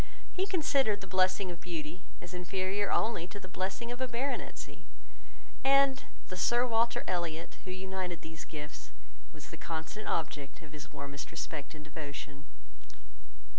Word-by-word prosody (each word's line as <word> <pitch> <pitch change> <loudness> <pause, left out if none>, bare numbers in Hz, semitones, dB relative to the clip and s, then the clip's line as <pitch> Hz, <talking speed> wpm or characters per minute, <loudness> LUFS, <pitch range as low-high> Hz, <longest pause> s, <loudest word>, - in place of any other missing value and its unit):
He 380 +1 +2
considered 275 - +4
the - - -5
blessing 185 0 +4
of 170 -1 -7
beauty 165 0 -3 0.2
as 175 - -7
inferior 190 +3 +1
only 215 -7 +3
to 200 - -6
the 185 - -8
blessing 190 +6 -2
of 245 +1 -4
a 260 - +3
baronetcy; 250 +3 -2 0.8
and 275 0 +7 0.2
the 185 - -4
Sir 240 +7 +5
Walter 235 -1 +4
Elliot, 170 -2 -1
who - - -5
united 185 -2 -2
these 160 0 -6
gifts, 150 -1 -6 0.4
was - - -10
the - - -6
constant 165 +6 -3
object 145 -1 -1
of 150 - -10
his 155 +1 -8
warmest 140 0 -5
respect 155 -2 -4
and 150 -1 -8
devotion. 145 -2 -6
185 Hz, 150 wpm, -34 LUFS, 160-225 Hz, 0.8 s, and